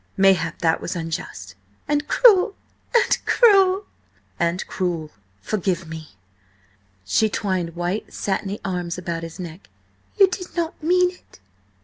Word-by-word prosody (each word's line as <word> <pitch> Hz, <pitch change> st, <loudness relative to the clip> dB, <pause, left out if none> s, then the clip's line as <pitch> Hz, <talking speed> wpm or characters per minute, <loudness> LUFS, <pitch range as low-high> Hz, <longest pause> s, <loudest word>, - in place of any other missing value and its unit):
Mayhap 190 Hz, -4 st, +3 dB
that 160 Hz, -1 st, +2 dB
was -, -, -4 dB
unjust." 160 Hz, -, -5 dB, 0.3 s
"And 295 Hz, 0 st, 0 dB
cruel! 405 Hz, -5 st, +5 dB, 0.4 s
And 475 Hz, -, +4 dB
cruel!" 390 Hz, -4 st, +5 dB, 0.5 s
"And 170 Hz, +1 st, 0 dB
cruel. 170 Hz, -4 st, -3 dB, 0.3 s
Forgive 185 Hz, -, -2 dB
me." 160 Hz, -8 st, -9 dB, 0.9 s
She 160 Hz, -, +2 dB
twined 185 Hz, -5 st, -2 dB
white, 175 Hz, +4 st, -3 dB
satiny 200 Hz, +1 st, -2 dB
arms 180 Hz, -3 st, -3 dB
about 170 Hz, -2 st, -4 dB
his 165 Hz, +2 st, -8 dB
neck. 175 Hz, +1 st, -9 dB, 0.5 s
"You 395 Hz, -2 st, +7 dB
did 365 Hz, -1 st, -6 dB
not 335 Hz, -2 st, -2 dB
mean 360 Hz, +3 st, +3 dB
it?" 360 Hz, -, -20 dB
185 Hz, 125 wpm, -22 LUFS, -, 0.9 s, You